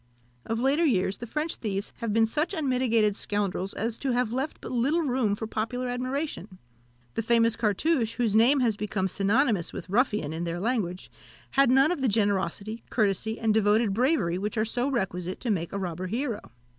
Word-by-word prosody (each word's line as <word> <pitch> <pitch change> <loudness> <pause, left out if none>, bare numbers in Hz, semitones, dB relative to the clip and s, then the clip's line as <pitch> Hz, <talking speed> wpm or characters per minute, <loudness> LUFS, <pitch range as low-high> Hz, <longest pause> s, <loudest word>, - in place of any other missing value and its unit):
Of 225 0 -1
later 275 +6 +2
years, 195 - +1
the 240 - -6
French 305 +7 -2
thieves 200 -2 -3
have 230 -2 -3
been 225 +1 +4
such 300 - -1
unmitigated 250 - +2
scoundrels 200 -2 -2
as 230 +1 -2
to 270 -3 -1
have 245 -2 0
left 270 +4 -3
but - - -8
little 275 +8 +1
room 250 -7 +1
for 220 - -5
popular 245 +4 -3
admiration. 250 - -4 0.6
The - - -1
famous 230 0 +3
Cartouche, 230 - +1
whose 235 -4 0
name 245 +6 +5
has 230 -4 +2
become 205 -2 -2
synonymous 200 - +1
with 185 - -7
ruffian 210 - +1
in 165 +1 -3
their 170 0 -3
language, 195 -5 -2 0.4
had 275 -2 +4
none 270 +5 +5
of 345 -6 -2
the 265 - +2
generosity, 205 0 0
courtesy, 220 0 0
and 220 -1 +2
devoted 215 0 +3
bravery 215 - +1
which 210 +3 -3
are 215 - +2
so 245 +4 -1
requisite 185 -7 -2
to 240 - -1
make 170 -4 -2
a - - -3
robber 185 -1 -4
hero. 230 - -3
225 Hz, 185 wpm, -27 LUFS, 200-255 Hz, 0.6 s, name